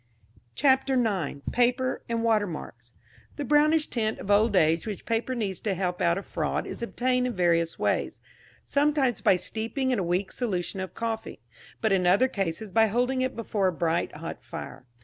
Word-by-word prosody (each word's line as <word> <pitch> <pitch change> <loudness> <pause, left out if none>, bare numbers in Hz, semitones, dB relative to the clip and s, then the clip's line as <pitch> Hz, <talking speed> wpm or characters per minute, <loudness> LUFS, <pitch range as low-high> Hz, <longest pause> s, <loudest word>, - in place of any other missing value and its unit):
CHAPTER 265 -1 +3
IX. 195 - 0
PAPER 250 +1 +1
AND 230 -1 -1
WATERMARKS. 175 - -1 0.4
The 290 - -4
brownish 300 +3 +3
tint 220 -3 -1
of 200 - -4
old 210 +1 +4
age 165 +1 +3
which 210 -3 -5
paper 230 +3 -1
needs 200 -6 -3
to 200 -3 -1
help 180 -1 -2
out 170 +1 +3
a 195 - -4
fraud - - -2
is - - -7
obtained 250 +1 0
in 245 - -3
various 170 -3 +1
ways - - -1 0.4
sometimes 280 -4 +1
by - - +5
steeping 225 +8 -2
in 250 - +1
a - - 0
weak 180 +3 -1
solution 195 -6 -3
of 185 -2 -5
coffee, 225 - -4 0.4
but 220 - +2
in 185 -2 +2
other 200 +9 +5
cases 195 -2 -3
by 225 +2 +4
holding 250 +4 0
it 260 0 -1
before 210 -4 0
a - - +2
bright 165 0 -1
hot - - -7
fire. 125 - -8
220 Hz, 180 wpm, -27 LUFS, 180-250 Hz, 0.4 s, by